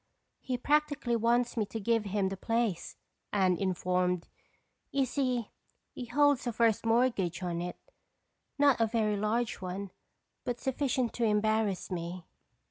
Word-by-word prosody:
"He 255 Hz, -2 st, -3 dB
practically 290 Hz, -2 st, +1 dB
wants 235 Hz, +2 st, +2 dB
me 215 Hz, -3 st, 0 dB
to 225 Hz, -, -5 dB
give 225 Hz, +1 st, +1 dB
him 200 Hz, -1 st, 0 dB
the 195 Hz, -, -4 dB
place," 225 Hz, -3 st, -1 dB, 0.3 s
Anne 190 Hz, -3 st, +3 dB
informed. 180 Hz, -1 st, 0 dB, 0.6 s
"You 275 Hz, -1 st, +2 dB
see, 250 Hz, -4 st, -1 dB, 0.4 s
he 250 Hz, -, -6 dB
holds 285 Hz, +1 st, +3 dB
a -, -, +1 dB
first 230 Hz, -1 st, +2 dB
mortgage 225 Hz, -7 st, +1 dB
on 170 Hz, -1 st, -2 dB
it—not 280 Hz, -, -2 dB
a 225 Hz, -, +4 dB
very 215 Hz, -2 st, +1 dB
large 220 Hz, +3 st, 0 dB
one 190 Hz, +1 st, -5 dB, 0.5 s
but 245 Hz, -1 st, -3 dB
sufficient 260 Hz, -2 st, 0 dB
to 240 Hz, -, -2 dB
embarrass 215 Hz, -2 st, +1 dB
me. 175 Hz, 0 st, -4 dB
225 Hz, 135 wpm, -31 LUFS, 190-245 Hz, 0.6 s, a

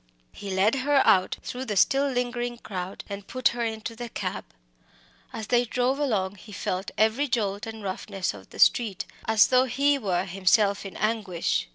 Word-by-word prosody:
He 200 Hz, -, -8 dB
led 195 Hz, +4 st, +2 dB
her 285 Hz, +1 st, +3 dB
out 185 Hz, -1 st, +4 dB
through 255 Hz, +1 st, -5 dB
the 210 Hz, -5 st, -2 dB
still 270 Hz, +8 st, +4 dB
lingering 245 Hz, -1 st, -2 dB
crowd 185 Hz, -4 st, -6 dB
and 200 Hz, -1 st, -7 dB
put 255 Hz, -1 st, +2 dB
her 240 Hz, 0 st, -3 dB
into 225 Hz, 0 st, -4 dB
the 240 Hz, +1 st, -6 dB
cab. -, -, -4 dB, 0.9 s
As 220 Hz, -1 st, -5 dB
they 240 Hz, +3 st, +3 dB
drove 250 Hz, +3 st, 0 dB
along, 205 Hz, -9 st, 0 dB
he 210 Hz, -, -13 dB
felt 185 Hz, -1 st, -3 dB
every 220 Hz, +7 st, +2 dB
jolt 210 Hz, -3 st, -1 dB
and 220 Hz, -1 st, -8 dB
roughness 195 Hz, 0 st, -3 dB
of 95 Hz, -2 st, -13 dB
the -, -, -13 dB
street 220 Hz, -6 st, +3 dB, 0.2 s
as 220 Hz, -1 st, +5 dB
though 255 Hz, 0 st, +5 dB
he 280 Hz, +3 st, +2 dB
were 185 Hz, -5 st, 0 dB
himself 195 Hz, +2 st, +2 dB
in 190 Hz, -, -10 dB
anguish. 195 Hz, -, -1 dB
220 Hz, 180 wpm, -26 LUFS, 195-245 Hz, 0.9 s, as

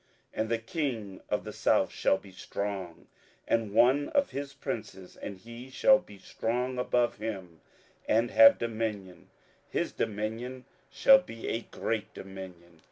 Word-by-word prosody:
27:011:005 -, -, -1 dB
And 110 Hz, -, -1 dB
the 115 Hz, -, +2 dB
king 115 Hz, -, -3 dB
of -, -, 0 dB
the -, -, -7 dB
south -, -, +2 dB
shall 95 Hz, -, +2 dB
be 100 Hz, -, -14 dB
strong, 95 Hz, -2 st, -5 dB, 0.4 s
and 115 Hz, -3 st, +1 dB
one 130 Hz, +7 st, +4 dB
of 285 Hz, -1 st, +1 dB
his 140 Hz, 0 st, -4 dB
princes; 95 Hz, -8 st, -6 dB
and 100 Hz, -, -7 dB
he 115 Hz, +6 st, -11 dB
shall 265 Hz, -, +5 dB
be 100 Hz, -, -14 dB
strong 125 Hz, +6 st, -2 dB
above 125 Hz, -1 st, +1 dB
him, 95 Hz, -8 st, -6 dB, 0.5 s
and 115 Hz, +2 st, +2 dB
have 115 Hz, 0 st, +8 dB
dominion; 110 Hz, -5 st, -4 dB, 0.4 s
his -, -, -1 dB
dominion 115 Hz, +5 st, -3 dB, 0.2 s
shall 270 Hz, 0 st, +7 dB
be 115 Hz, -, -8 dB
a 115 Hz, -, -1 dB
great 110 Hz, -2 st, -2 dB
dominion. 90 Hz, -3 st, -10 dB
110 Hz, 150 wpm, -29 LUFS, 95-125 Hz, 0.5 s, have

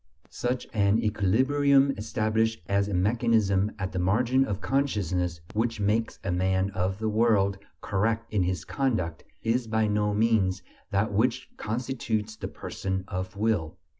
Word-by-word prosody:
Such 125 Hz, +1 st, -2 dB
an 100 Hz, -1 st, +3 dB
equilibrium 135 Hz, +7 st, +3 dB
established 110 Hz, +1 st, 0 dB
as 100 Hz, 0 st, +1 dB
a 105 Hz, -, -3 dB
mechanism 105 Hz, 0 st, +2 dB
at 95 Hz, -1 st, -3 dB
the 95 Hz, -, -2 dB
margin 120 Hz, +8 st, +2 dB
of 100 Hz, -6 st, -3 dB
consciousness, 90 Hz, -, -1 dB
which 115 Hz, +1 st, -1 dB
makes 105 Hz, +3 st, 0 dB
a 95 Hz, -, -1 dB
man 95 Hz, +2 st, +1 dB
of 95 Hz, 0 st, -1 dB
the 110 Hz, +1 st, -2 dB
world 105 Hz, -3 st, +2 dB, 0.2 s
"correct" 110 Hz, +3 st, -1 dB
in 105 Hz, -, +2 dB
his 90 Hz, -2 st, -1 dB
conduct, 110 Hz, -, -1 dB, 0.2 s
is 115 Hz, +1 st, 0 dB
by 110 Hz, 0 st, +1 dB
no 105 Hz, 0 st, +1 dB
means 105 Hz, -4 st, +2 dB, 0.3 s
that 100 Hz, +2 st, 0 dB
which 125 Hz, +4 st, 0 dB
constitutes 110 Hz, -2 st, -3 dB
the -, -, -5 dB
"person 95 Hz, -1 st, -4 dB
of 95 Hz, +3 st, -5 dB
will." 105 Hz, -7 st, 0 dB
105 Hz, 145 wpm, -27 LUFS, 95-115 Hz, 0.3 s, an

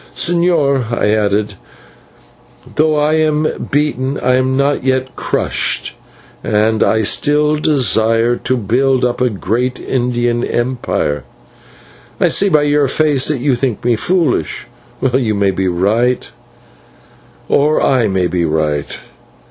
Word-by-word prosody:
"Señor," 155 Hz, -8 st, +1 dB
I 115 Hz, -3 st, 0 dB
added, 105 Hz, -1 st, 0 dB, 1.2 s
"though 155 Hz, 0 st, +2 dB
I 150 Hz, +1 st, +1 dB
am 155 Hz, 0 st, -1 dB
beaten 140 Hz, -2 st, -1 dB
I 125 Hz, -, +1 dB
am 130 Hz, +1 st, +1 dB
not 140 Hz, 0 st, 0 dB
yet 130 Hz, 0 st, -1 dB
crushed, -, -, -2 dB, 0.5 s
and 110 Hz, +1 st, +1 dB
I 110 Hz, 0 st, +2 dB
still 150 Hz, +6 st, +2 dB
desire 120 Hz, -5 st, +2 dB
to 130 Hz, -, -1 dB
build 125 Hz, +4 st, +1 dB
up 125 Hz, 0 st, -2 dB
a 125 Hz, -, +2 dB
great 120 Hz, +5 st, -2 dB
Indian 120 Hz, -1 st, -1 dB
empire. 120 Hz, -, -2 dB, 1.0 s
I -, -, +3 dB
see 200 Hz, -, +3 dB
by 155 Hz, -4 st, +3 dB
your 145 Hz, -1 st, +2 dB
face 145 Hz, -1 st, +2 dB
that 150 Hz, -5 st, -2 dB
you 140 Hz, 0 st, +1 dB
think 120 Hz, -3 st, -2 dB
me 120 Hz, -1 st, +3 dB
foolish. 155 Hz, -, -1 dB, 0.5 s
You 120 Hz, -5 st, +1 dB
may 100 Hz, -1 st, +1 dB
be 95 Hz, 0 st, -2 dB
right 110 Hz, +8 st, 0 dB, 1.2 s
or 150 Hz, +2 st, +2 dB
I 125 Hz, -5 st, +2 dB
may 95 Hz, -2 st, 0 dB
be 90 Hz, 0 st, -1 dB
right. 75 Hz, -2 st, -2 dB
125 Hz, 130 wpm, -15 LUFS, 110-145 Hz, 1.2 s, I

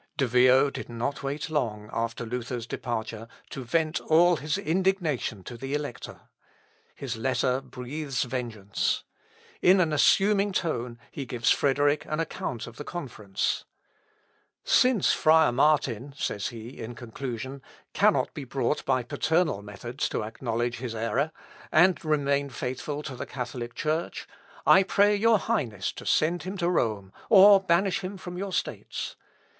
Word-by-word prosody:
De 135 Hz, -, +2 dB
Vio 130 Hz, +3 st, +5 dB
did -, -, -7 dB
not 120 Hz, +4 st, -3 dB
wait 140 Hz, +2 st, -3 dB
long, 110 Hz, -8 st, -1 dB
after 115 Hz, 0 st, -2 dB
Luther's 120 Hz, 0 st, -4 dB
departure, 115 Hz, -2 st, -4 dB, 0.2 s
to 135 Hz, -, -5 dB
vent 155 Hz, +5 st, 0 dB
all 170 Hz, +2 st, +4 dB
his 150 Hz, +4 st, -2 dB
indignation 175 Hz, -, 0 dB
to 120 Hz, -, -8 dB
the 135 Hz, +4 st, -4 dB
Elector. 145 Hz, -5 st, -6 dB, 0.7 s
His 130 Hz, -4 st, -5 dB
letter 130 Hz, +1 st, 0 dB
breathes 130 Hz, +2 st, -4 dB
vengeance. 115 Hz, -5 st, -2 dB, 0.6 s
In 185 Hz, +2 st, +6 dB
an 165 Hz, -4 st, +2 dB
assuming 200 Hz, +6 st, +4 dB
tone 125 Hz, -10 st, -2 dB
he 135 Hz, -3 st, -6 dB
gives 120 Hz, 0 st, +1 dB
Frederick 145 Hz, +1 st, +2 dB
an 155 Hz, -, -3 dB
account 130 Hz, -7 st, -3 dB
of 120 Hz, 0 st, -12 dB
the -, -, -6 dB
conference. 115 Hz, -, -3 dB, 1.0 s
"Since 250 Hz, -7 st, +4 dB
friar 160 Hz, -2 st, +5 dB
Martin," 140 Hz, -1 st, +1 dB
says 105 Hz, -8 st, -2 dB
he, 115 Hz, +2 st, -9 dB
in 120 Hz, +1 st, -6 dB
conclusion, 125 Hz, +2 st, -6 dB, 0.3 s
"cannot -, -, +3 dB
be 145 Hz, -, -6 dB
brought 130 Hz, +2 st, -1 dB
by 130 Hz, -2 st, +1 dB
paternal 160 Hz, -, 0 dB
methods 120 Hz, +6 st, -4 dB
to -, -, -2 dB
acknowledge 120 Hz, +2 st, -2 dB
his 120 Hz, -1 st, -5 dB
error, 115 Hz, +7 st, 0 dB, 0.4 s
and 175 Hz, +3 st, +4 dB
remain 140 Hz, -2 st, +1 dB
faithful 130 Hz, +4 st, -4 dB
to 140 Hz, -4 st, -6 dB
the -, -, -6 dB
Catholic 120 Hz, -2 st, -5 dB
Church, 155 Hz, +3 st, -2 dB, 0.4 s
I 190 Hz, -, +7 dB
pray 205 Hz, +2 st, +3 dB
your 225 Hz, +2 st, +4 dB
Highness 125 Hz, -, -1 dB
to -, -, -10 dB
send 170 Hz, +3 st, +2 dB
him 190 Hz, +2 st, -5 dB
to 175 Hz, -1 st, +1 dB
Rome, 105 Hz, -, -1 dB, 0.2 s
or 200 Hz, -1 st, +9 dB
banish 190 Hz, +1 st, +2 dB
him 195 Hz, +1 st, -6 dB
from 180 Hz, -1 st, -8 dB
your 195 Hz, +2 st, -4 dB
States. -, -, -3 dB
135 Hz, 145 wpm, -27 LUFS, 120-160 Hz, 1.0 s, or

